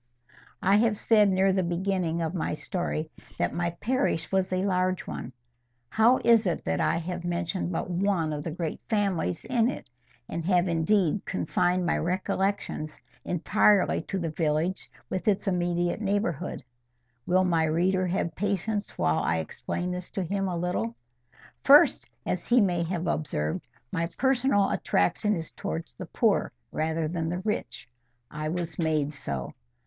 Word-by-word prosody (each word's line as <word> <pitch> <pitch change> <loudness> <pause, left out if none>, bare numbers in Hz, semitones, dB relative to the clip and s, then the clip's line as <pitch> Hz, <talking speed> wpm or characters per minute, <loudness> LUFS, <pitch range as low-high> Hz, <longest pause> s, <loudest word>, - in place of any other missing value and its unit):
I 195 +2 +5
HAVE 220 -1 +2
said, 210 -2 +4
near 190 0 +3
the 190 - +2
beginning 175 -1 -1
of 160 +1 -2
my 170 -4 -1
story, 155 -2 -3 0.3
that - - 0
my 175 0 0
parish 170 - -1
was 190 -1 +1
a 185 +1 0
large 185 -1 0
one: 125 - -6 0.6
how 230 - +5
is 230 -3 +5
it 170 - -2
that 80 0 0
I - - +2
have 175 +1 -4
mentioned 175 +1 -2
but 165 - -2
one 180 -3 0
of 150 0 -4
the 165 - -3
great 165 0 -4
families 195 - 0
in 240 -2 +2
it, 190 - -7 0.4
and 165 - -4
have 180 -1 +3
indeed 170 +2 +2
confined 180 -1 0
my 170 - +1
recollections 185 -2 -2 0.2
entirely 200 +3 +3
to 195 - -4
the 165 -3 -2
village 160 +3 0 0.2
and 185 - -3
its 200 -2 +2
immediate 175 +1 0
neighbourhood? 195 -7 -1 0.6
Will 185 +1 +4
my 165 -3 +2
reader 180 +4 +1
have 175 -2 -1
patience 205 +3 -2
while 80 0 +2
I 80 +1 +1
explain 175 - -3
this 180 0 -5
to 195 - -1
him 195 +3 -1
a 180 -2 -2
little? 170 -10 -2 0.7
First, 285 +2 +6 0.2
as - - -2
he 245 +1 +5
may 180 -5 +2
have 170 +1 -2
observed, 130 - -2 0.2
my 170 0 0
personal 260 -6 +3
attraction 205 - +1
is 165 -1 -5
towards 165 0 -5
the 185 - -8
poor 210 - +1 0.2
rather 160 0 -1
than 165 0 -2
the 175 - -2
rich. 210 - -3 0.4
I 155 +1 -3
was 170 -1 -3
made 155 -3 +1
so. 70 - -5
180 Hz, 160 wpm, -27 LUFS, 160-195 Hz, 0.7 s, First